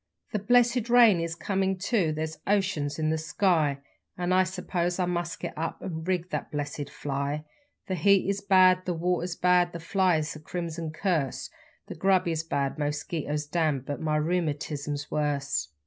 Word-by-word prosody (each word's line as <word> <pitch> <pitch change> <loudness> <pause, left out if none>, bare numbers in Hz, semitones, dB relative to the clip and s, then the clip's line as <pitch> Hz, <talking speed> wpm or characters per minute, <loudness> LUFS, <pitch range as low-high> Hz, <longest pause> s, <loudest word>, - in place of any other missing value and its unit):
The 210 - -1
blessed 240 +2 +3
rain 235 -6 +6
is 165 0 -3
comin' 190 +1 -1
too 190 -3 +1
there's 155 0 -4
oceans 190 -8 0
in 155 -1 0
the 160 - 0
sky, 160 -3 +1 0.4
An' 180 0 0
I 185 0 +4
suppose 180 -1 -2
I 185 - +1
must 175 -1 -2
get - - -5
up 160 +1 -3
and 160 -2 -6
rig 180 -1 -1
the - - -2
blessed 145 -1 -4
fly; 140 +2 -3 0.4
The 190 - -3
heat 190 +3 +3
is 200 0 -1
bad, 185 -2 +5
the 180 - -1
water's 175 +1 -1
bad, 180 0 +3
the 170 - -5
flies 165 -3 +1
a - - -8
crimson 165 0 -4
curse, 160 -4 -1 0.3
The - - -7
grub 190 -2 +2
is 160 -1 -1
bad, 140 -3 -2
mosquitoes 150 0 -2
damned 150 -4 0
but 145 - -4
rheumatism's 150 -2 -1
worse. 145 - -1
170 Hz, 165 wpm, -27 LUFS, 150-185 Hz, 0.4 s, rain